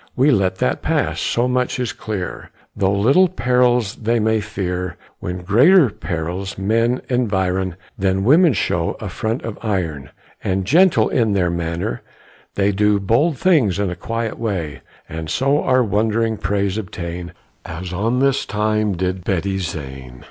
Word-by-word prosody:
We 135 +4 +4
let 95 -6 +2
that 65 -8 -1
pass - - 0
so 120 +1 +1
much 125 0 0
is 125 -2 -2
clear, 105 -5 -5 0.3
Though 95 0 +1
little 140 - +5
perils 125 - +1
they 115 +1 0
may 110 0 +1
fear, 90 -4 -4 0.2
When 90 0 -5
greater 130 - +5
perils 90 +3 -4
men 115 +5 +1
environ, 95 -7 0 0.2
Then 95 0 +1
women 155 - +5
show - - 0
a - - -5
front 110 +3 -3
of 115 -2 -6
iron; 85 - -2 0.3
And, 95 0 -1
gentle 175 - +4
in 115 -5 +1
their 90 -3 +1
manner, 85 -6 -3 0.5
they 100 0 +2
Do 105 +1 +2
bold 125 - +2
things 130 - +3
in 100 -2 -1
a - - -4
quiet 115 +5 -4
way, 95 -10 -3 0.3
And 80 0 -6
so 140 - +1
our 130 0 +3
wondering 110 +1 0
praise 100 0 -1
obtain, 85 -3 -6 0.3
As 90 +3 -6
on 115 +7 0
a 140 0 +4
time 105 -5 -1
did 90 0 -2
Betty 95 +1 -1
Zane. 65 -8 -6
100 Hz, 155 wpm, -20 LUFS, 90-120 Hz, 0.5 s, little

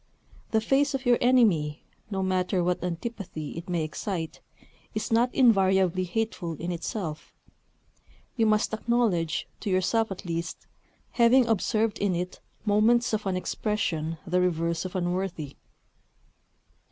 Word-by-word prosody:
The 220 - +2
face 275 +4 +2
of 270 0 -4
your 245 -1 +4
enemy, 200 -13 +3 0.3
no 190 -2 -2
matter 185 0 +1
what 180 0 0
antipathy 180 -3 -5
it 165 +2 -8
may 170 -3 0
excite, 160 +1 -4 0.5
is 215 - -3
not 235 +2 +3
invariably 190 -7 +3
hateful 180 -3 -2
in 170 +3 -4
itself: 170 -2 -4 1.0
you 225 -3 +2
must 215 0 +2
acknowledge, 215 -9 0
to 210 - -4
yourself 195 +5 +2
at 190 - -6
least, 170 0 -4 0.5
having 245 +2 +5
observed 220 0 +1
in 200 -3 +1
it 180 +1 -4 0.3
moments 225 +3 +3
of 210 -2 -1
an 185 -1 0
expression 170 -5 -2
the 180 0 +1
reverse 170 -1 0
of 185 - -6
unworthy. 175 -5 -2
190 Hz, 130 wpm, -27 LUFS, 170-225 Hz, 1.0 s, having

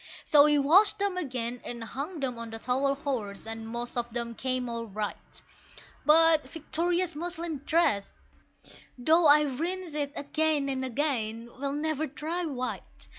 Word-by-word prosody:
So 290 -1 +6
we 300 -1 +4
washed 345 +10 +5
them 400 -2 0
again 250 -8 -3
and 235 -1 -6
hung 280 - -5
them 250 -3 -2
on 230 0 -6
the 225 - -6
towel 265 +4 0
horse, 240 -9 -4
and 225 0 -6
most 240 +1 -5
of 240 -1 -2
them 235 -1 -3
came 255 +1 -2
all 230 -1 -4
right, 210 0 -6 0.7
But 315 -2 +6
Victoria's 340 +3 -1
muslin 335 -2 -4
dress 310 -12 +2 0.9
though 320 +6 +4
I 300 +1 +7
rinsed 330 +5 -3
it 290 -2 -2
again 300 -1 0
and 265 -1 -2
again 235 -4 -2
will 280 0 -2
never 310 +1 -1
dry 325 +5 -4
white! 255 -4 -6
280 Hz, 155 wpm, -28 LUFS, 240-315 Hz, 0.9 s, I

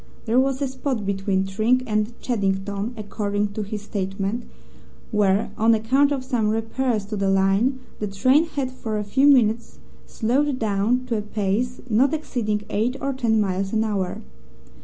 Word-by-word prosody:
There 235 +2 +3
was 270 0 +1
a - - +1
spot 260 -4 -3
between 195 -1 0
Tring 220 +6 +1
and 215 0 -1
Cheddington, 200 -1 -1
according 205 -1 -2
to 200 +2 -5
his 210 0 -5
statement, 200 +2 -3 0.7
where, 205 -1 +2
on 225 +1 +5
account 265 +6 +2
of 270 -2 -1
some 245 -5 0
repairs 225 0 -1
to 210 +1 -5
the 195 -1 0
line, 195 +7 +2 0.2
the 210 - -2
train 255 +11 +3
had 275 -5 -3
for 225 -4 -4
a 210 - -1
few 265 +8 +3
minutes 235 -5 +3 0.3
slowed 265 +4 0
down 220 +3 +1
to 235 -3 -1
a - - -1
pace 210 +4 -2
not 255 +6 +3
exceeding 215 -9 -2
eight 230 +5 0
or 275 0 -1
ten 230 -4 +1
miles 195 0 -1
an 220 0 +2
hour. 200 -4 -2
220 Hz, 165 wpm, -23 LUFS, 200-255 Hz, 0.7 s, on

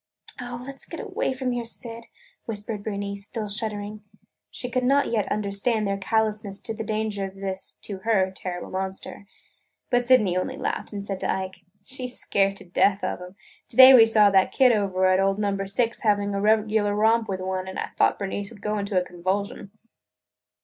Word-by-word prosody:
"Oh, 245 0 -6
let 275 0 -9
's - - -5
get - - -8
away - - -2
from 260 -1 -2
here, 240 -1 -2
Syd!" 230 0 -3 0.4
whispered 210 -1 -4
Bernice, 200 -1 -4
still 220 0 -4
shuddering. 210 0 -3 0.5
She 245 - -5
could 255 +1 -1
not 275 +1 +3
yet 215 -3 0
understand 210 +2 0
their 195 0 -1
callousness 210 -1 -1
to 225 - -4
the 225 +1 -5
danger 215 -2 -2
of 190 0 -8
this 190 -1 -5
(to 200 -2 -5
her) 190 -2 +1
terrible 180 -1 -5
monster. 190 +1 -5 0.6
But 245 0 +3
Sydney 240 -8 +4
only 185 - -2
laughed - - -3
and 200 -1 -5
said 195 -2 -3
to - - 0
Ike: 190 0 -3 0.3
"She 255 +1 -4
's 250 - -6
scared 195 0 +1
to - - -10
death 190 +3 +2
of - - -2
'em! 180 +1 -10 0.3
To - - -9
day 260 0 +11
we 230 -3 +8
saw 215 -2 +6
that 190 -1 +4
kid 260 -2 +5
over 195 -4 +1
at 185 0 +4
old 195 0 +2
Number 200 -2 -1
Six 230 +4 0
having 205 -2 +1
a 200 - -1
regular 215 -1 +2
romp 220 +1 +3
with 190 -1 -2
one 185 0 -3
and 190 - -6
I - - -3
thought - - +3
Bernice 200 0 -4
would 210 -4 -15
go 210 0 -1
into 200 -2 0
a 180 - -3
convulsion!" 190 +5 -3
205 Hz, 200 wpm, -25 LUFS, 195-225 Hz, 0.6 s, day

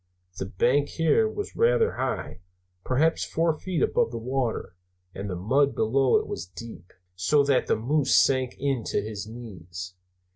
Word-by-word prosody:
The 95 - -3
bank 130 +9 +2
here 165 +7 +2
was 410 - -6
rather 470 0 +3
high, - - -3 0.4
perhaps 155 +6 +2
four 165 -1 0
feet 180 -7 -1
above - - +2
the 115 - -5
water, 120 -5 -2 0.4
and 100 +1 -5
the 90 - -3
mud 135 +10 +2
below 130 +4 +3
it - - -1
was 90 - -5
deep, 95 -2 -11 0.2
so 95 +11 +3
that 140 -2 +2
the - - +3
moose 140 +5 +1
sank 130 -2 +3
in 135 -4 -1
to - - 0
his 105 -1 -6
knees. 90 -6 -8
130 Hz, 160 wpm, -26 LUFS, 105-145 Hz, 0.4 s, rather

